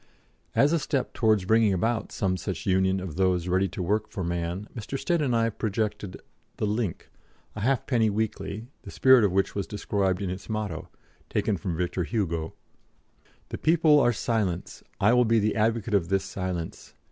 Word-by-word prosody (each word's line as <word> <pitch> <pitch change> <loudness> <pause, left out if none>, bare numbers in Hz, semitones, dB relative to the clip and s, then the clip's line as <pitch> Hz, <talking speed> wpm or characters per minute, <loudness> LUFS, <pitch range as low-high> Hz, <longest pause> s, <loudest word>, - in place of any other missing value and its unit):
As 145 +4 +4
a 170 - +3
step 135 -2 -2
towards 110 -5 +2
bringing 110 0 +4
about 110 +5 -1
some 95 -2 0
such 95 -1 -5
union 95 0 +2
of 90 -3 -6
those 90 -2 +1
ready 95 +2 +2
to 90 +1 -5
work 105 +4 0
for 95 - -4
man, 85 +3 -3
Mr. 120 +4 -4
Stead 170 +3 0
and 130 -5 +1
I 115 0 +2
projected 105 -3 -3 0.4
the - - -1
Link, 105 -4 -2 0.4
a - - -5
halfpenny 120 -1 +1
weekly, 105 0 -3 0.2
the - - -11
spirit 130 -3 +5
of 100 - +3
which 95 +1 +1
was 100 -2 -3
described 100 -3 -1
in 90 - -2
its 95 +4 -8
motto, 105 -7 -3 0.4
taken 105 - 0
from 85 -2 -4
Victor 90 +1 -1
Hugo: 85 -3 -2 0.9
"The - - -5
people 155 -2 +5
are 120 - +4
silence. 105 -7 -2 0.2
I 105 +4 +4
will 125 0 +5
be 115 0 +3
the 105 0 +1
advocate 110 0 0
of 90 -5 +2
this 95 0 +1
silence. 90 -3 -5
100 Hz, 180 wpm, -27 LUFS, 95-115 Hz, 0.9 s, spirit